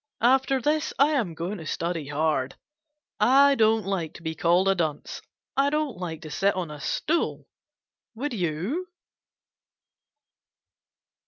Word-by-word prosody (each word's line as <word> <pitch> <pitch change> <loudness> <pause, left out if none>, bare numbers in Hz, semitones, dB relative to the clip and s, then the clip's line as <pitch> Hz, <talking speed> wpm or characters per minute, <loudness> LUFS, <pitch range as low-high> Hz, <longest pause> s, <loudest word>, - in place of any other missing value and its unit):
After 265 +2 +3
this 305 +4 0
I 280 +2 +5
am 225 - -1
going 175 +5 -4
to 160 - -9
study 165 -3 -3
hard. 145 -2 0 0.6
I 280 +2 +6
don't 220 -3 +3
like 190 -5 -3
to - - -12
be 160 -1 -2
called 175 +4 +2
a 195 - +5
dunce. 160 -5 -3 0.3
I 275 +1 +3
don't 300 -3 -1
like 175 -3 -6
to 155 - -8
sit 195 +7 +1
on 175 -4 -3
a 150 - -8
stool. 325 - -1 0.7
Would 270 +4 -3
you? 190 - -2
195 Hz, 140 wpm, -26 LUFS, 160-270 Hz, 0.7 s, I